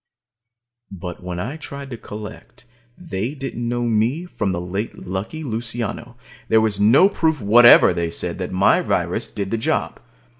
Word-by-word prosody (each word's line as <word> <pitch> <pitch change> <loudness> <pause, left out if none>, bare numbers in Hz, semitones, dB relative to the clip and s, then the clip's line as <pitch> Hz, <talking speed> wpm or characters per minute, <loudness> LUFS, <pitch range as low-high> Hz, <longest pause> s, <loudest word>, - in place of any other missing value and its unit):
But 90 -2 -8
when 90 -1 -5
I 125 - -4
tried 140 -3 -8
to - - -4
collect, 110 +3 -10 0.3
they 140 - -4
didn't 120 -4 -4
know 120 0 -1
me 120 +8 0
from 105 - -3
the 85 - -2
late 95 +5 -4
Lucky 100 - -5
Luciano. 120 0 -4 0.3
There 110 - +5
was 110 -2 0
no 115 - +6
proof 160 -6 0
whatever, 120 +3 +7
they 85 -1 -2
said, 85 +1 -2
that 90 - -4
my 95 +1 +3
virus - - -1
did 100 -2 -5
the 115 - -1
job. - - -1
110 Hz, 160 wpm, -21 LUFS, 95-125 Hz, 0.3 s, whatever